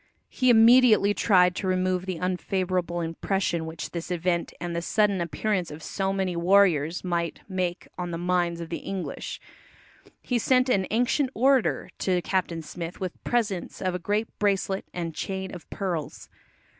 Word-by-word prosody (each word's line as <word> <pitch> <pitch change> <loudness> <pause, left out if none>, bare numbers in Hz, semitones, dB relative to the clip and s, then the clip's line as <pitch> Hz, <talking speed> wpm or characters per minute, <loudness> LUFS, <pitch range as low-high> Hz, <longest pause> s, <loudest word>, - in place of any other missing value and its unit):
He 255 -1 +1
immediately 230 -3 +6
tried 180 -4 +4
to 190 - -2
remove 185 0 0
the 185 -2 -2
unfavourable 180 -1 -1
impression 170 0 -1
which 160 0 -6
this 170 0 -5
event 175 0 -1
and 175 0 -4
the 170 - -1
sudden 200 +1 +1
appearance 175 +3 -1
of 150 +1 -9
so 195 -1 -1
many 190 -2 -1
warriors 170 -3 +3
might 170 -2 -2
make 185 -2 -2
on 175 -1 -3
the 170 - -3
minds 175 -1 0
of 165 - -7
the 170 - -3
English. 195 -2 -5 0.8
He 245 -2 0
sent 255 +2 +3
an 190 -6 +2
"ancient 250 +4 +1
orator" 265 0 +2
to 185 -2 +1
Captain 175 -4 -1
Smith 170 +2 -7
with 185 -2 -5
presents 215 -7 -1
of 185 -1 -1
a 180 - -2
great 210 +5 0
bracelet 195 -1 0
and 170 -2 -4
chain 190 +3 -4
of 175 - -10
pearls. 170 -7 -4
185 Hz, 160 wpm, -26 LUFS, 170-200 Hz, 0.8 s, immediately